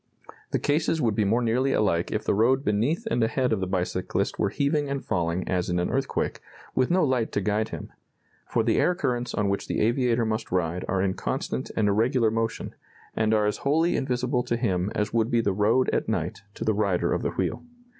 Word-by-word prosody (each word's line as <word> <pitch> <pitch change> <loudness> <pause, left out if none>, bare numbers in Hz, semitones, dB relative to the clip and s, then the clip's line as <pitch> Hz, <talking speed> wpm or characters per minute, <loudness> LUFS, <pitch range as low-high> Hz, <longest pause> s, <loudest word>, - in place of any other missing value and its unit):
The - - +1
cases 150 +2 +1
would 115 -7 +1
be 105 0 +1
more 115 +5 +2
nearly 125 +4 +1
alike 85 -5 +1
if 110 - -1
the - - +1
road 125 +6 +2
beneath 120 - +1
and 120 - +2
ahead 125 +2 +1
of 110 - 0
the 95 - -2
bicyclist 90 0 -1
were - - +2
heaving 145 0 0
and 140 -1 -3
falling 85 +1 -1
as 90 -1 -1
in 90 - 0
an 90 - 0
earthquake, - - -1 0.3
with 130 - +2
no 185 +1 +3
light 125 -4 0
to - - +1
guide 105 +2 0
him; - - -8 0.5
for 115 - +1
the 115 0 +2
air 180 - +3
currents 125 -6 -2
on 105 - +1
which 100 0 -1
the - - -1
aviator 120 +1 +2
must 110 0 -3
ride 90 0 0
are 95 -1 0
in 95 -1 +1
constant - - -3
and 105 - +3
irregular 115 +3 +2
motion, 115 0 -2 0.4
and 110 0 +1
are 105 -1 +3
as 105 - 0
wholly 160 +5 +2
invisible 125 -1 0
to 120 -1 -1
him 95 -5 0
as 105 +1 -1
would 115 -1 +2
be 120 - +2
the 100 -4 +1
road 110 +6 +2
at - - 0
night - - -2
to - - -5
the 110 - +3
rider 100 -4 +1
of - - -1
the - - 0
wheel. - - -2
110 Hz, 220 wpm, -26 LUFS, 100-125 Hz, 0.5 s, no